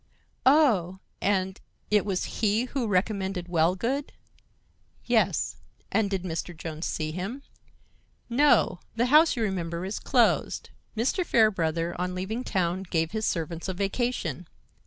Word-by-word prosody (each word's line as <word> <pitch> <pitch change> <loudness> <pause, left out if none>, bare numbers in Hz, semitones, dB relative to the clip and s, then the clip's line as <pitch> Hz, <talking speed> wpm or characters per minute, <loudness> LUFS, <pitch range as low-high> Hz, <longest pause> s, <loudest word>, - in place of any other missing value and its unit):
"Oh! 230 - +4 0.2
and 190 -1 0 0.3
it 210 -1 +4
was 190 -2 -1 0.2
he 215 +1 +3
who 255 -2 -2
recommended 190 -2 -1
Wellgood?" 180 - 0 0.9
"Yes." - - +1 0.3
"And 220 -2 +2
did 195 -2 -2
Mr. 170 -1 -4
Jones 160 0 -5
see 155 0 -2
him?" 195 - -5 0.8
"No. 260 -7 +3 0.2
The 235 +1 +2
house, 315 +2 +7
you 235 - -1
remember, 175 -3 -2
is 195 - -3
closed. - - +1 0.3
Mr. 260 - +1
Fairbrother, 170 - +2
on 180 0 -2
leaving 210 +7 -3
town, 185 -4 0
gave 165 -3 -1
his 220 0 -1
servants 165 +1 -3
a 190 - -3
vacation. 195 - -2
190 Hz, 130 wpm, -27 LUFS, 175-225 Hz, 0.9 s, house